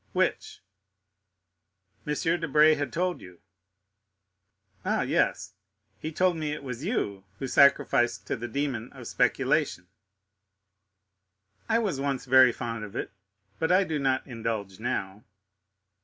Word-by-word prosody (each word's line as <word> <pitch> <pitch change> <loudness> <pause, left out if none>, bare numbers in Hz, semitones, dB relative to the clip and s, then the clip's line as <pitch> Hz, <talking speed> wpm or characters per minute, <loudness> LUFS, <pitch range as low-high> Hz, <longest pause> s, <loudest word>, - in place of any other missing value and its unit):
"Which?" - - -1 1.4
"M. 150 - 0 0.2
Debray 155 -1 +5
had 145 -4 -2
told 180 +4 -1
you——" 90 -1 -13 1.4
"Ah, - - +1
yes; - - 0 0.5
he 155 - -5
told 180 +1 +2
me 155 -2 -2
it 150 - -7
was 125 0 -6
you 100 - -2
who 135 - -4
sacrificed 130 -3 +3
to - - -2
the 120 +1 -5
demon 130 -4 -3
of 130 -3 -11
speculation." 130 - 0 1.8
"I 225 - +4
was 200 -11 -1
once 135 -2 -2
very 130 -1 +7
fond 115 -1 -5
of 105 -1 -9
it, - - -4 0.5
but 160 - +1
I 185 +2 +5
do 160 -5 -2
not 135 -1 0
indulge 110 -6 -4
now." 105 -3 -3
135 Hz, 125 wpm, -27 LUFS, 115-155 Hz, 1.8 s, very